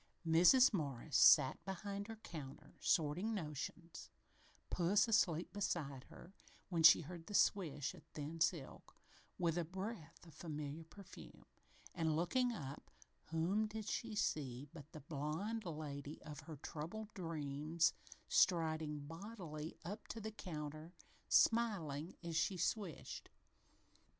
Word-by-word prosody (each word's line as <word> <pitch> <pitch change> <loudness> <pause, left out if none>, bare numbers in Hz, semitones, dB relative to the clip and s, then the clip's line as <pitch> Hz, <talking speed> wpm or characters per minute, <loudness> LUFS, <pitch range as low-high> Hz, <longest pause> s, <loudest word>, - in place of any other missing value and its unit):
Mrs. 180 +11 +7
Morris 145 - -2
sat 130 - +7
behind 200 +1 -4
her 225 - -6
counter, 155 -10 -9
sorting 175 +8 +1
notions, 165 0 -5 0.6
puss 195 +5 +3
asleep 180 -7 +2
beside 155 -10 -2
her, 185 - -13 0.4
when 170 -3 0
she 165 +1 +9
heard 165 +1 -9
the 205 - -4
swish 150 -10 +2
of - - -13
thin 155 +1 -6
silk, 160 -3 -1 0.4
with 170 -1 +1
a - - +1
breath 185 -1 -6
of 165 - -14
familiar 150 0 -5
perfume, 195 +3 -13 0.5
and, 160 -3 +1
looking 245 +10 +2
up, 145 - -7 0.4
whom 180 +7 +1
did 215 0 -6
she 230 -2 -2
see 140 -8 -1
but 155 -2 -11
the 155 - -9
blond 160 +10 -3
lady 150 -3 -5
of 150 -2 -8
her 155 +1 -8
troubled 175 +9 -6
dreams 160 -1 0 0.3
striding 160 -4 +2
bodily 165 -2 -7
up 205 +5 -6
to 225 - -5
the 220 0 -5
counter, 155 -3 -6 0.3
smiling 180 -9 +2
as 170 -1 -4
she 180 +4 +1
swished. 190 0 -3
165 Hz, 125 wpm, -39 LUFS, 150-200 Hz, 0.6 s, she